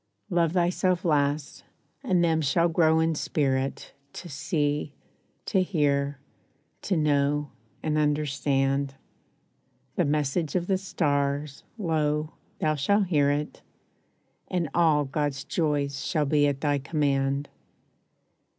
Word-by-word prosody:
Love 170 -2 +2
thyself 180 0 +1
last, 145 -2 0 0.4
and 180 -2 +2
them 160 -1 +2
shall 155 +4 +2
grow 160 -1 +3
in 160 0 +2
spirit 135 -3 -1 0.2
To 175 - -8
see, 145 0 -1 0.5
to 190 - +2
hear, 145 -6 0 0.6
to 190 - 0
know, 145 -1 +1 0.3
and 155 -1 +1
understand. 140 -2 0 1.0
The - - +3
message 150 +1 0
of 175 -1 +1
the 190 0 +1
stars, 145 -5 -1
lo, 155 -5 0 0.2
thou 155 - +1
shall 200 +9 +2
hear 150 -6 +2
it, 145 +1 -2 0.9
And 175 -4 -1
all 155 -4 +3
God's 140 -1 -2
joys 145 -3 -1
shall 155 -4 0
be 145 0 +3
at 140 -1 -2
thy 145 -2 +1
command. 140 -1 0
150 Hz, 115 wpm, -26 LUFS, 140-165 Hz, 1.0 s, grow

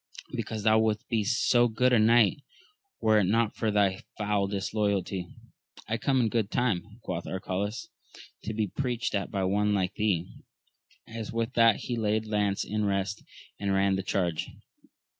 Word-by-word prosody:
— - - -19
Because 110 -2 -4
thou 110 0 +5
wouldst 110 -1 0
be 110 -2 +1
so 120 +2 +3
good 125 +3 +2
a 120 - +5
knight 115 +3 +4 0.6
were 110 -1 +4
it 100 - +2
not 115 +3 +1
for 110 - -1
thy 100 -2 +2 0.2
foul 105 -2 0
disloyalty. 100 -2 -1 0.6
I 115 - -1
come 135 0 +2
in 115 - +2
good 110 -3 0
time, 105 -3 -1
quoth 85 -2 -4
Arcalaus, 95 +3 -3 0.6
to 110 - -3
be 110 -1 +1
preached 120 +2 -2
at 100 -1 -1
by 100 -1 -2
one 105 +2 +1
like 95 -1 0
thee! 100 -6 0 0.8
and 110 -1 -7
with 115 +2 -2
that 115 -2 +4
he 120 - -3
laid 110 0 0
lance 105 -2 0
in 105 +1 -2
rest, 100 -1 -1 0.4
and 100 -1 0
ran 95 0 +3
the 95 - -1
charge. 90 -4 -1
105 Hz, 170 wpm, -28 LUFS, 100-115 Hz, 0.8 s, thou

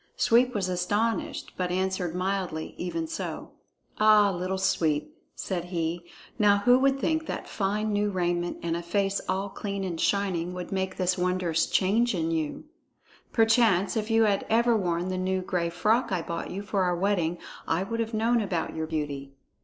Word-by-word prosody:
Sweep 245 +1 +3
was 195 -3 0
astonished, 205 +6 -1
but 180 -1 -1
answered 185 -1 -1
mildly, 185 -4 -2
even 180 - -3
so. 320 0 -5 0.5
"Ah, 215 -1 +6
Little 185 +1 -2
Sweep," 155 -5 0 0.2
said 175 -3 -3
he, 175 -1 -3 0.3
"now 205 -1 +5
who 245 +1 +6
would 270 0 +2
think 315 +2 0
that - - -4
fine 210 +2 -1
new 205 0 +1
raiment 175 -2 -1
and 165 -1 -1
a 170 - -3
face 195 +3 0
all 190 +2 0
clean 200 0 -4
and 175 -3 -3
shining 180 -3 0
would 180 -1 -6
make 190 -1 -2
this 185 -1 +1
wondrous 180 -2 +1
change 215 +4 +2
in 165 -1 -1
you? 160 -2 -2 0.7
But - - -35
perchance, 225 -4 +3
if 215 0 -2
you 225 0 +4
had 205 -2 +2
ever 235 +1 +4
worn 175 -3 0
the 185 0 -2
new 185 0 -1
gray 175 -2 -1
frock 220 +8 +1
I 180 -3 0
bought 170 0 -4
you 195 +2 -5
for 200 -1 -1
our 180 -1 +2
wedding, 175 -2 0 0.3
I 165 +3 +1
would 230 +4 -4
have 225 0 -2
known 230 +2 +2
about 180 -5 -2
your 160 0 -3
beauty." 145 -3 -4
190 Hz, 180 wpm, -27 LUFS, 175-210 Hz, 0.7 s, Ah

